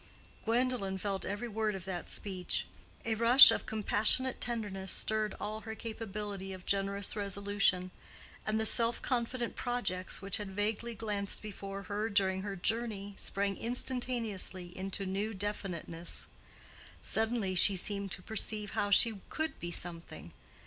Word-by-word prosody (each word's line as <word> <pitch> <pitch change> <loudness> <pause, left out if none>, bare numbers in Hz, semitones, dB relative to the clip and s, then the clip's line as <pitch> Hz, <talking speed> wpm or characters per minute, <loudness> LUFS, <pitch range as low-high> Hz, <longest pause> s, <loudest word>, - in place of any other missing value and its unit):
Gwendolen 230 -4 0
felt 195 0 -3
every 205 +5 -3
word 215 -2 -1
of 190 -2 -7
that 180 -2 -5
speech. 185 -3 -3 0.4
A 230 - 0
rush 235 +4 +9
of - - -2
compassionate 220 +4 +2
tenderness 205 -5 -2
stirred 215 -1 0
all 215 +1 -3
her 220 -1 -7
capability 210 -4 -5
of 185 -1 -10
generous 200 0 +1
resolution; 200 -2 0 0.5
and 215 0 0
the 220 - 0
self 230 +1 +5
confident 240 -1 -1
projects 240 -7 -2
which 195 -1 0
had 205 -2 -5
vaguely 215 +4 -2
glanced 205 -3 -1
before 200 -1 -7
her 210 +3 -2
during 190 -2 +1
her 200 0 -4
journey 205 0 -2
sprang 200 0 -2
instantaneously 230 -7 +1
into 195 +1 -4
new 200 +3 -2
definiteness. 185 -4 -3 0.8
Suddenly 220 -3 +1
she 190 +2 +5
seemed 200 +1 -1
to 180 - -5
perceive 215 0 -3
how 205 - -1
she 205 0 +5
could 315 0 -3
be 175 - -5
"something." 165 - -7
205 Hz, 140 wpm, -32 LUFS, 195-225 Hz, 0.8 s, rush